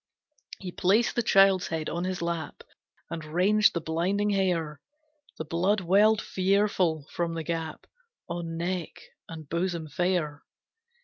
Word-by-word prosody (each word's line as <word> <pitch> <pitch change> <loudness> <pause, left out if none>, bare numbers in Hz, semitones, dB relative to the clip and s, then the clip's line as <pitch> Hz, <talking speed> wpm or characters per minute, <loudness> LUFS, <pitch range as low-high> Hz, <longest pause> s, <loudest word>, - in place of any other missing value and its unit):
He 185 -2 -7
placed 200 +7 +2
the 240 - +2
child's 195 -3 +4
head 160 -1 -3
on 170 +2 -2
his 185 -2 -3
lap, 170 -2 -4 0.5
And 160 - -4
ranged 185 +8 +3
the 170 - -1
blinding 185 +6 0
hair, 170 -7 0 0.6
The 160 - -5
blood 185 +6 +1
welled 205 +5 +4
fearful 185 -5 +1
from 170 -1 -2
the 165 - -3
gap 165 -1 -4 0.4
On 170 -1 -4
neck 175 0 -3 0.3
and 160 -2 -9
bosom 170 0 -2
fair. 175 -4 -1
175 Hz, 135 wpm, -27 LUFS, 165-195 Hz, 0.6 s, child's